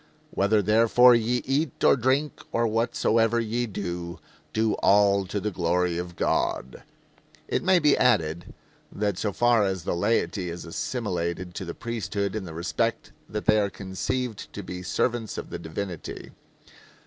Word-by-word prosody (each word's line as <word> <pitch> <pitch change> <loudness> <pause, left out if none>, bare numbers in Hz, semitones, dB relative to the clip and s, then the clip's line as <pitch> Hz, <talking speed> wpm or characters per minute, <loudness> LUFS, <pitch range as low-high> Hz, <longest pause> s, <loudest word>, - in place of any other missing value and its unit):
"Whether 100 +1 +2
therefore 115 +4 +6
ye 120 +1 +1
eat, 140 +2 -1
or - - +6
drink, 135 +4 0
or 115 0 +1
whatsoever 115 0 +2
ye 115 +2 -1
do, 85 -4 -5 0.3
do 110 -1 +1
all 100 -1 +4
to 100 +2 -2
the 105 +2 -2
glory 90 -1 0
of 90 -1 -6
God." 65 -5 -1 0.7
It - - 0
may 185 0 +4
be 150 -4 +4
added 85 -9 +1 0.4
that 100 -3 -2
so 105 - -1
far 120 +1 +3
as 95 -3 -1
the - - -1
laity 90 -1 0
is 85 +1 -7
assimilated 90 -2 -3
to 95 - -5
the 85 - -6
priesthood 110 -3 -3
in 105 -3 -3
the 80 - -8
respect 80 -2 -2 0.2
that 105 - -4
they 110 -1 +5
are 100 -1 +1
conceived 100 +5 -4
to - - -6
be 90 0 -6
servants 115 +4 -1
of - - -6
the - - -5
divinity. 85 +1 -6
105 Hz, 160 wpm, -26 LUFS, 90-115 Hz, 0.7 s, therefore